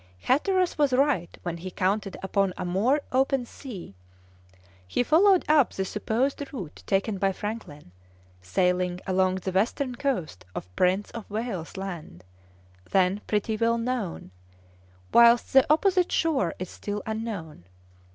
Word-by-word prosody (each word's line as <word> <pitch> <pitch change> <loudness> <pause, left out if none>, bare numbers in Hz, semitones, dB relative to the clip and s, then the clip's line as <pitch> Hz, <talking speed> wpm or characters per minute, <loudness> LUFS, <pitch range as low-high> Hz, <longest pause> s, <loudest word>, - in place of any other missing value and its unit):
Hatteras 365 +6 +1
was 285 -3 +3
right 260 - +1
when 175 -1 -3
he 185 +3 -6
counted 195 +2 -1
upon 195 -1 0
a - - -3
more 220 +12 +2
open 265 -1 +2
sea; 225 - -9 0.9
he 90 - +1
followed 370 +7 +5
up 300 -4 +4
the 190 - -2
supposed 230 +8 -1
route 190 - -7
taken 195 +1 0
by 195 0 +2
Franklin, 190 - -7 0.5
sailing 180 - 0
along 185 0 +2
the 190 0 -3
western 245 +7 0
coast 240 - -2
of 90 0 -7
Prince 185 - +1
of 230 -2 -8
Wales's 205 -6 -4
Land, 170 - -7 0.7
then 190 +1 +2
pretty 215 +1 0
well 230 +1 +2
known, 230 - -3 0.8
whilst 235 0 +6
the 270 +2 +6
opposite 365 +2 +3
shore 275 - +1
is 185 - -6
still 205 0 -5
unknown. 215 - -5
210 Hz, 135 wpm, -26 LUFS, 185-255 Hz, 0.9 s, whilst